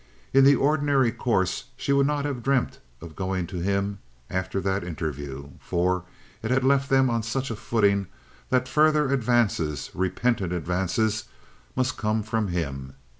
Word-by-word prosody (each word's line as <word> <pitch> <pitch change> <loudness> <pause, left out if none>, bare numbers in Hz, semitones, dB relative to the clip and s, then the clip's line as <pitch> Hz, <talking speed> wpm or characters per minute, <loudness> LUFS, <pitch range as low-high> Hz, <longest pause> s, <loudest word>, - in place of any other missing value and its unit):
In 135 0 +7
the 140 +1 +7
ordinary 140 -3 +2
course 100 -5 0
she 140 - 0
would 140 0 +4
not 145 -1 -1
have 140 -4 -3
dreamt 135 0 0 0.2
of 80 -1 -10
going 95 -2 -2
to 90 +1 -7
him 100 +2 -1 0.3
after 95 +1 -1
that 95 +1 -1
interview, 70 -5 -5
for 90 0 0 0.4
it 110 - -3
had 130 +1 +2
left 140 +1 +3
them 135 -1 +4
on 115 -1 +1
such 125 +4 -2
a - - -3
footing 100 -3 +1 0.4
that 130 0 +2
further 150 -1 +3
advances, 115 - +1
repentant 95 +1 0
advances, 95 +6 0 0.5
must 130 0 0
come 110 0 0
from 110 0 -1
him. 70 -7 -4
110 Hz, 155 wpm, -25 LUFS, 90-130 Hz, 0.5 s, In